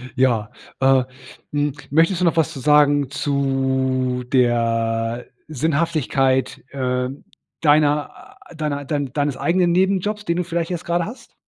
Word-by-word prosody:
Ja, 120 Hz, -5 st, +1 dB, 0.3 s
äh, 135 Hz, -1 st, +4 dB, 0.5 s
hm, 145 Hz, -1 st, 0 dB, 0.2 s
möchtest 165 Hz, +5 st, +2 dB
du -, -, +3 dB
noch 170 Hz, -, +2 dB
was 160 Hz, 0 st, +2 dB
zu 135 Hz, -, -7 dB
sagen 145 Hz, -1 st, +4 dB
zu 130 Hz, -2 st, 0 dB
der 115 Hz, -1 st, +1 dB, 0.2 s
Sinnhaftigkeit, 140 Hz, -4 st, 0 dB
ähm, 130 Hz, 0 st, -3 dB, 0.4 s
deiner, 150 Hz, -1 st, +3 dB, 0.4 s
a -, -, -12 dB
deiner 150 Hz, -2 st, -3 dB
dein 145 Hz, -3 st, -3 dB
deines 145 Hz, -2 st, -1 dB
eigenen 170 Hz, +5 st, +2 dB
Nebenjobs, 195 Hz, +3 st, 0 dB
den 170 Hz, +1 st, 0 dB
du 180 Hz, -, 0 dB
vielleicht 170 Hz, 0 st, -3 dB
jetzt 175 Hz, -3 st, -4 dB
grade 170 Hz, 0 st, 0 dB
hast? 235 Hz, +3 st, -11 dB
145 Hz, 135 wpm, -21 LUFS, 130-165 Hz, 0.5 s, äh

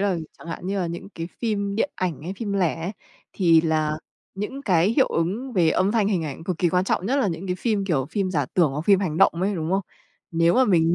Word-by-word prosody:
là 200 Hz, -2 st, +1 dB, 0.2 s
chẳng -, -, -13 dB
hạn 165 Hz, +2 st, -6 dB
như 195 Hz, +1 st, -1 dB
là 180 Hz, -, 0 dB
những 170 Hz, +3 st, -6 dB
cái 165 Hz, 0 st, -5 dB
phim 200 Hz, -3 st, -1 dB
điện 230 Hz, -, +1 dB
ảnh 170 Hz, -7 st, -3 dB
hay 175 Hz, +4 st, -4 dB
phim 205 Hz, -1 st, -3 dB
lẻ 175 Hz, -5 st, 0 dB
ấy, 175 Hz, +5 st, -3 dB, 0.4 s
thì 165 Hz, -4 st, +5 dB
là 155 Hz, -1 st, 0 dB, 0.4 s
những 210 Hz, +8 st, -5 dB
cái 180 Hz, -6 st, +3 dB
hiệu 260 Hz, +3 st, +3 dB
ứng 205 Hz, +11 st, -2 dB
về 170 Hz, -6 st, +3 dB
âm 185 Hz, +5 st, +2 dB
thanh 220 Hz, -3 st, +2 dB
hình 185 Hz, -6 st, 0 dB
ảnh 150 Hz, +1 st, -6 dB
cực 180 Hz, -2 st, -2 dB
kỳ 175 Hz, -, +3 dB
quan 180 Hz, +2 st, +1 dB
trọng, 190 Hz, -, 0 dB
nhất 260 Hz, +5 st, +1 dB
là 265 Hz, -7 st, +2 dB
những 175 Hz, +2 st, -4 dB
cái 180 Hz, -1 st, -1 dB
phim, 210 Hz, -1 st, 0 dB
kiểu, 150 Hz, -9 st, 0 dB
phim 195 Hz, -3 st, -1 dB
giả 145 Hz, -7 st, 0 dB
tưởng 165 Hz, -6 st, +3 dB
hoặc 145 Hz, -, -2 dB
phim 195 Hz, 0 st, +5 dB
hành 170 Hz, -6 st, -2 dB
động -, -, +5 dB
ấy, 200 Hz, +1 st, +1 dB
đúng 160 Hz, -2 st, -3 dB
không? 190 Hz, +1 st, +2 dB, 0.5 s
Nếu 165 Hz, 0 st, +3 dB
mà 260 Hz, -, +5 dB
mình 170 Hz, -5 st, +3 dB
185 Hz, 265 wpm, -24 LUFS, 165-200 Hz, 0.5 s, thì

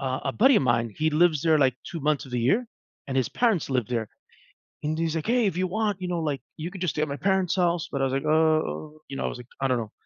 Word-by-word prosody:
uh, 130 Hz, -1 st, -2 dB
a 135 Hz, -, -1 dB
buddy 260 Hz, +1 st, +5 dB
of -, -, +3 dB
mine, 120 Hz, -2 st, +1 dB
he 155 Hz, +1 st, +1 dB
lives 155 Hz, -1 st, +3 dB
there, 160 Hz, -2 st, +4 dB
like, 130 Hz, -3 st, +3 dB, 0.2 s
2 165 Hz, -, -5 dB
months 150 Hz, 0 st, +1 dB
of 130 Hz, -, -12 dB
the 125 Hz, -, 0 dB
year, 205 Hz, -, +2 dB, 0.4 s
and 135 Hz, -, -4 dB
his 130 Hz, -, +2 dB
parents 225 Hz, -8 st, +1 dB
live 125 Hz, -4 st, +1 dB
there, 115 Hz, -3 st, -2 dB, 0.8 s
and 155 Hz, +1 st, -1 dB
he's 165 Hz, 0 st, -1 dB
like, 160 Hz, +5 st, -3 dB
"Hey, 240 Hz, -1 st, +3 dB
if 185 Hz, -3 st, 0 dB
you 185 Hz, 0 st, +1 dB
want, 210 Hz, 0 st, -1 dB
you 180 Hz, -, -3 dB
know, 175 Hz, -1 st, -1 dB
like, 140 Hz, -5 st, -2 dB, 0.2 s
you 165 Hz, +3 st, -5 dB
could 190 Hz, -2 st, -9 dB
just 180 Hz, -, 0 dB
stay 150 Hz, -, 0 dB
at -, -, -1 dB
my 140 Hz, -, -3 dB
parents' 190 Hz, -2 st, +1 dB
house," 175 Hz, -3 st, +1 dB
but 140 Hz, -, -2 dB
I -, -, +3 dB
was 130 Hz, -, -1 dB
like, 135 Hz, +2 st, -1 dB
"Oh," 155 Hz, 0 st, +1 dB
you 135 Hz, -, -7 dB
know, -, -, -2 dB
I -, -, +1 dB
was -, -, -5 dB
like, 125 Hz, -1 st, -11 dB
"I 135 Hz, -, +2 dB
don't 130 Hz, -1 st, +1 dB
know." 110 Hz, -2 st, -5 dB
155 Hz, 300 wpm, -26 LUFS, 135-180 Hz, 0.8 s, buddy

